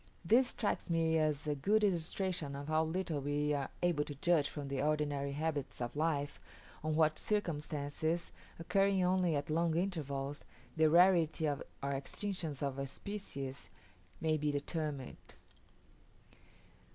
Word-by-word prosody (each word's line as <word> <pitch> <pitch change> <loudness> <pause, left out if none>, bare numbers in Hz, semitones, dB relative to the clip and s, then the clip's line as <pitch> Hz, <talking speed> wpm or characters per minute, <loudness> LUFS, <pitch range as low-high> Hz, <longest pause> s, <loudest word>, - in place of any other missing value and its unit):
This 245 +8 +5
strikes 210 -5 -2
me 165 -1 +3
as 155 -2 +1
a 150 - +1
good 205 +10 +2
illustration 175 -4 0
of 140 +2 -6
how 155 0 +3
little 160 -2 -1
we 145 +1 0
are 140 -2 -1
able 170 -4 +3
to 145 - -6
judge 155 0 +2
from 145 -2 -5
the 135 -1 -1
ordinary 145 -2 0
habits 150 -2 -2
of 120 +1 -3
life, 150 -2 0 0.4
on 155 0 0
what 155 -1 +3
circumstances, 160 -4 -1 0.3
occurring 195 +2 +2
only 180 -2 +3
at 145 +2 -2
long 165 0 +2
intervals, 145 -6 -2 0.4
the 160 -1 +5
rarity 170 -2 +5
or 145 -1 -1 0.2
extinction 150 +4 -3
of 140 -1 -2
a 135 - -2
species 140 -7 -6 0.5
may 155 -1 +2
be 150 0 0
determined. 145 -2 -3
155 Hz, 140 wpm, -35 LUFS, 145-170 Hz, 0.5 s, This